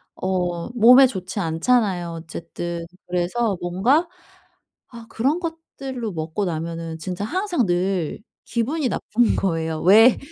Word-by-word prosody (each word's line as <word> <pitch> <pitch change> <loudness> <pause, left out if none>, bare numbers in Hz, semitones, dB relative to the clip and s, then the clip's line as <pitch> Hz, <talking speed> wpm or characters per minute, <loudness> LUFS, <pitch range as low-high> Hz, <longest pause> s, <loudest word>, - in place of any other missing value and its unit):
어 180 -1 -2
몸에 245 +3 +7
좋지 190 -3 -5
않잖아요 180 +1 +1
어쨌든. 170 +1 -6 0.2
그래서 185 +4 0
뭔가 215 - +2 0.9
아 235 -1 -10
그런 275 +9 0
것들로 275 - -6
먹고 160 +4 -3
나면은 165 -1 -4
진짜 180 +4 -4
항상 360 - 0
늘 175 -2 -1 0.3
기분이 260 +4 -1
나쁜 230 +2 +1
거예요. 160 -4 -1
왜 220 +7 +7
190 Hz, 245 characters per minute, -22 LUFS, 170-245 Hz, 0.9 s, 몸에